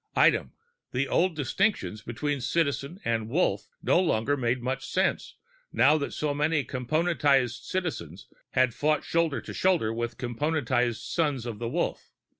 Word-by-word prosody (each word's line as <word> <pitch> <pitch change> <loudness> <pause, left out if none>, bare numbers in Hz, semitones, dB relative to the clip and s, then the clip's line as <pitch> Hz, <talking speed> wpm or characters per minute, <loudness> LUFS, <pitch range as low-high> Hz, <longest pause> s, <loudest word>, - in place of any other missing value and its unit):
Item: - - +4 0.4
the 135 +2 0
old 180 -1 +2
distinctions 140 - 0
between 135 +5 -3
Citizen 145 +3 -1
and 115 -1 0
Wolf 170 +9 +1 0.2
no - - +4
longer 145 -6 +1
made 125 -1 0
much 130 +2 -3
sense - - -1 0.4
now 150 - +5
that 140 - -3
so 150 -1 -1
many 150 +1 +1
Componentized 135 -3 +1
Citizens 120 - -4 0.3
had 130 -2 +3
fought 150 +4 +1
shoulder 165 -3 0
to - - -8
shoulder 175 -13 +2
with 120 +1 -3
Componentized 125 -2 0
Sons 145 -7 -1
of 115 -3 -5
the 115 -1 -3
Wolf. - - -2
140 Hz, 145 wpm, -27 LUFS, 120-155 Hz, 0.4 s, now